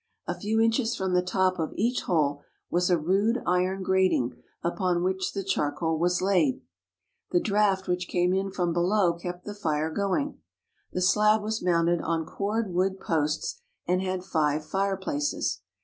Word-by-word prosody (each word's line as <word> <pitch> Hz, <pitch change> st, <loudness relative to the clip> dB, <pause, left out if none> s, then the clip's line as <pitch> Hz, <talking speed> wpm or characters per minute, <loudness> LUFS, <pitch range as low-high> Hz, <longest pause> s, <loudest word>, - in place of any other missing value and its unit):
A -, -, -2 dB
few 220 Hz, +2 st, -1 dB
inches 225 Hz, +1 st, +2 dB
from 190 Hz, -1 st, -2 dB
the 180 Hz, -, +4 dB
top 185 Hz, 0 st, +1 dB
of 160 Hz, -, -2 dB
each 240 Hz, +4 st, 0 dB
hole 145 Hz, -4 st, +1 dB, 0.3 s
was 180 Hz, +1 st, +2 dB
a 175 Hz, -, +4 dB
rude 195 Hz, +9 st, +1 dB
iron 185 Hz, +2 st, +1 dB
grating 185 Hz, -10 st, +2 dB, 0.3 s
upon 175 Hz, 0 st, 0 dB
which 190 Hz, 0 st, -1 dB
the 195 Hz, -, -3 dB
charcoal 160 Hz, -2 st, -1 dB
was 180 Hz, +2 st, +1 dB
laid. 180 Hz, -9 st, +2 dB, 0.7 s
The 175 Hz, -, +3 dB
draft 200 Hz, -1 st, +1 dB
which 180 Hz, 0 st, -1 dB
came 180 Hz, 0 st, +1 dB
in 195 Hz, +1 st, 0 dB
from 180 Hz, -3 st, -1 dB
below 175 Hz, +1 st, +2 dB
kept 175 Hz, +1 st, -7 dB
the 205 Hz, -, -5 dB
fire 160 Hz, -5 st, -1 dB
going. 200 Hz, -, -1 dB, 0.5 s
The 185 Hz, -, -1 dB
slab 210 Hz, +3 st, +4 dB
was 220 Hz, +1 st, -2 dB
mounted 170 Hz, -1 st, +2 dB
on 165 Hz, -1 st, -1 dB
cord 205 Hz, +1 st, -2 dB
wood 190 Hz, +2 st, +1 dB
posts 160 Hz, -, -1 dB, 0.2 s
and 180 Hz, +1 st, +1 dB
had 185 Hz, -1 st, -2 dB
five 155 Hz, -3 st, 0 dB
fireplaces. 195 Hz, -, -1 dB
185 Hz, 165 wpm, -27 LUFS, 170-200 Hz, 0.7 s, the